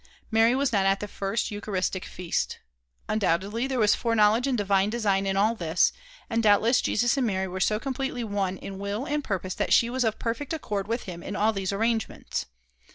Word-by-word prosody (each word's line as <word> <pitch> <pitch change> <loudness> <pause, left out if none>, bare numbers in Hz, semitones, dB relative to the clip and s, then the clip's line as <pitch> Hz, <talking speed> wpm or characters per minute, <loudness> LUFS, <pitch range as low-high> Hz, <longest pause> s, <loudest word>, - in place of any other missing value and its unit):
Mary 225 +2 +4
was 275 -2 0
not 200 -2 +3
at 195 0 +2
the 210 - -4
first 200 +2 -2
Eucharistic 195 -2 -2
feast. 180 -2 -3 0.5
Undoubtedly 205 +3 0
there 265 -1 -2
was 210 -3 +4
foreknowledge 230 +1 +3
and 260 -3 +1
divine 200 -1 +2
design 200 -4 +1
in 195 0 0
all 215 +3 +3
this, 170 -5 +2 0.3
and 230 -1 0
doubtless 220 +3 +4
Jesus 240 +5 +1
and 255 -3 +2
Mary 190 -2 -1
were 185 +1 -5
so 210 +2 +2
completely 265 -1 -3
one 200 -3 -2
in 195 +1 -8
will 200 +5 -3
and 295 -1 -1
purpose 185 -4 -3
that - - 0
she 235 0 +4
was 260 0 0
of 220 -2 0
perfect 250 +6 -3
accord 205 -11 -3
with 230 +2 -2
him 175 -3 -7
in 200 - -6
all 215 +1 +2
these 195 -2 -2
arrangements. 225 +2 -2
210 Hz, 200 wpm, -26 LUFS, 195-235 Hz, 0.5 s, Mary